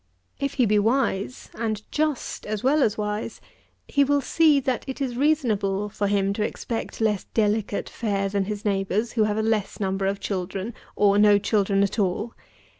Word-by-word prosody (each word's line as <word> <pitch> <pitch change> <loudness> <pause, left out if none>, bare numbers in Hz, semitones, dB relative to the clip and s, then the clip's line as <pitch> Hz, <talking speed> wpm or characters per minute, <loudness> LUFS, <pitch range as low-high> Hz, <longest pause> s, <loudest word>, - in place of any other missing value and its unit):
If 275 - -2
he 255 - +3
be 210 -1 +3
wise, 225 -1 0
and 215 -2 -3
just 300 -7 -2
as 210 -1 -3
well 290 +4 +3
as 220 -6 +2
wise, 210 +1 -3 0.5
he 285 - +3
will 285 +1 +2
see 300 +2 +4
that 260 -2 -1
it 265 - -5
is 260 -3 -2
reasonable 215 -9 +1
for 205 0 -2
him 200 -1 +1
to 210 - -1
expect 225 +1 -4
less 210 -3 +1
delicate 210 -1 0
fare 200 -3 -1
than 195 0 -1
his 210 +1 -5
neighbours, 200 +3 0
who 220 -3 +2
have 210 0 -1
a 220 - +1
less 220 -3 -1
number 195 -1 -1
of 200 0 -1
children, 195 +3 -3 0.2
or 205 0 +4
no 205 -1 +6
children 200 -1 +2
at 200 +3 -1
all. 205 +4 -1
210 Hz, 185 wpm, -24 LUFS, 200-240 Hz, 0.5 s, no